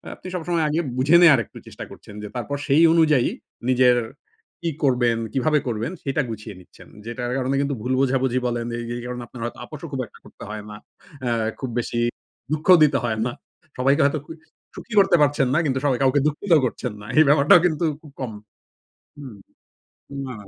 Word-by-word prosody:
আপনি - - -12
সবসময় 170 -1 -1
আগে 155 +2 0 0.2
বুঝে 140 +6 +4
নেয়ার 155 -7 +7
একটু - - -16
চেষ্টা - - -9
করছেন - - -13
যে, - - -5
তারপর 135 +4 -3
সেই 150 +3 +4
অনুযায়ী 155 -6 +4 0.4
নিজের 125 -1 +4 0.6
কি 170 - -1
করবেন, 125 -4 +2 0.2
কিভাবে 150 +3 +2
করবেন? 115 +4 -2
সেটা 140 +2 0
গুছিয়ে 105 -2 -7
নিচ্ছেন। 90 - -17 0.2
যেটার 120 +1 -4
কারণে 135 +1 -1
কিন্তু 140 0 -1
ভুল 125 +3 -1
বোঝাবুঝি 130 -1 +1
বলেন 120 -1 -2
যে, - - -3 0.2
এই - - -6
কারণে 125 0 -5
আপনার 120 0 -11
হয়তো 120 - -6
আপোসও - - -9
খুব - - -2
একটা - - -19
করতে - - -13
হয় 105 -1 -6
না। 105 - -8 0.5
আ - - +1 0.3
খুব 130 - -4
বেশি 120 0 -3 0.5
দুঃখও 155 +4 +5
দিতে 150 - +3
হয় 110 -2 -1
না। 125 - -1 0.5
সবাইকে 135 +4 +3
হয়তো 145 +2 +1
খু - - -10 0.4
সুখী 235 - -10
করতে 195 -3 +5
পারছেন 145 -2 +3
না, 155 - +3
কিন্তু 130 -2 0
সবাই 130 -4 +1
কাউকে 135 +2 +3
দুঃখিতও 155 +1 +2
করছেন 125 0 -3
না। - - -11
এই - - +9
ব্যাপারটাও 145 +6 +6
কিন্তু 160 -2 0 0.2
খুব 150 - -15
কম 130 -4 -4 0.9
হুম। 130 -7 -9 0.9
না। 130 - -6
135 Hz, 190 wpm, -22 LUFS, 120-150 Hz, 0.9 s, এই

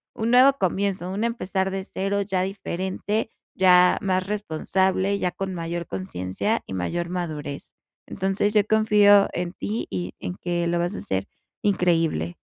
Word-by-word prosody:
un 225 +1 -1
nuevo 255 +3 +7
comienzo, 190 -1 -1
un 200 +4 -2
empezar 195 -5 -1
de 190 0 -3
cero 195 +1 -2
ya 190 -2 0
diferente, 195 +3 -3 0.2
ya 180 -1 +5
más 185 -2 0
responsable, 190 0 0
ya 180 - -1
con 190 +1 -4
mayor 170 0 -4
conciencia 95 - -2
y - - -6
mayor 170 - -2
madurez. 155 -5 -5 0.3
Entonces 195 +2 -1
yo 210 -1 +5
confío 210 -2 +5
en 175 0 -3
ti 215 +3 -4
y 90 -1 -4
en 90 0 -5
que 175 -1 -2
lo 170 0 0
vas 175 +2 -1
a - - -5
hacer 95 0 -2 0.4
increíble. 165 - +1
185 Hz, 155 wpm, -24 LUFS, 170-200 Hz, 0.4 s, nuevo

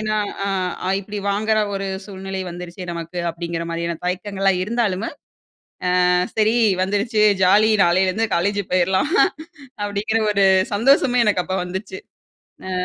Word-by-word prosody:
ஏன்னா 215 0 -1 0.3
அ 185 -2 -2
இப்படி 205 +1 -7
வாங்குற 215 +2 +1 0.2
ஒரு 195 0 -3 0.2
சூழ்நிலை 190 -1 -6
வந்துருச்சு 175 +1 -8
நமக்கு, 170 +1 -6
அப்படிங்கிற 170 0 -4
மாதிரியான 170 0 -3
தயக்கங்கள்லாம் 195 0 0
இருந்தாலுமு, 220 -2 -1 1.0
அ 180 - +3 0.2
சரி 220 +1 +2 0.3
வந்துருச்சு. 205 +3 0 0.2
ஜாலி 210 +4 +5
நாளேலிருந்து 185 +5 +2
காலேஜ் 200 +4 0
போயிரலாம். 190 - +1 0.7
அப்படிங்கிற 205 +2 -1
ஒரு 200 -1 +3 0.3
சந்தோஷமே 245 +2 +3
எனக்கு 200 -4 +2
அப்ப 190 - -2
வந்துச்சு. 190 +1 -6 0.7
அ. - - -4
195 Hz, 120 wpm, -21 LUFS, 180-215 Hz, 1.0 s, ஜாலி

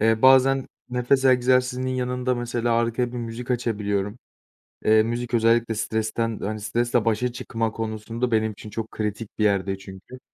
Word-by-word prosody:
Eee, 110 0 +2
bazen 135 0 +5 0.2
nefes 125 +2 +1
egzersizinin 125 0 +3
yanında 125 0 -1
mesela 120 -1 -1
arkaya 120 +1 0
bir - - -5
müzik 120 +1 -6
açabiliyorum. 105 -3 -1 0.7
Eee, 110 0 +5
müzik 120 +1 -3
özellikle 115 0 +3
stresten, 110 +1 -1
hani, 110 +1 -3
stresle 120 +2 0
başa 120 +2 +1
çıkma 115 -2 -3
konusunda 115 +2 -3
benim 110 0 +2
için 105 +1 -11
çok 110 +1 -5
kritik 105 0 -3
bir - - +2
yerde 100 -1 +1
çünkü. 95 +6 -12
115 Hz, 150 wpm, -24 LUFS, 110-125 Hz, 0.7 s, bazen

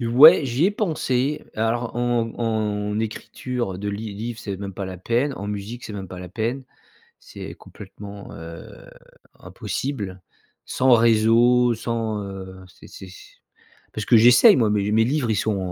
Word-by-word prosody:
ouais 135 +8 +7
j'y 130 +5 0
ai - - +2
pensé. 150 - -1
Alors 115 +2 -1
en 120 -2 0
en 105 -2 -1
écriture 115 -1 -4
de 105 +1 -4
li 100 +1 -5
livre 115 +2 -5
c'est 100 -3 -5
même 100 0 -6
pas 100 -2 -5
la 95 - -7
peine. 120 +8 0
En 100 - -7
musique 105 +4 -6
c'est 105 - -7
même 95 -2 -7
pas 90 - -9
la 90 - -8
peine. 115 +7 -3 0.5
C'est - - -10
complètement, 100 0 -11
heu, 85 0 -11 0.5
impossible. 105 -9 -5 0.5
Sans 130 0 +2
réseau, 115 +2 +4
sans, 110 -2 -3
heu 95 -1 -9
c'est - - -17
c'est 95 - -11
s 90 - -15 0.6
parce 105 -1 -5
que 120 - +5
j'essaie, 120 +4 +7
moi 115 -4 +2
mes 105 -1 0
mes 110 +1 +4
livres 130 -2 0
ils 105 - +1
sont 105 0 0
110 Hz, 165 wpm, -23 LUFS, 100-120 Hz, 0.6 s, ouais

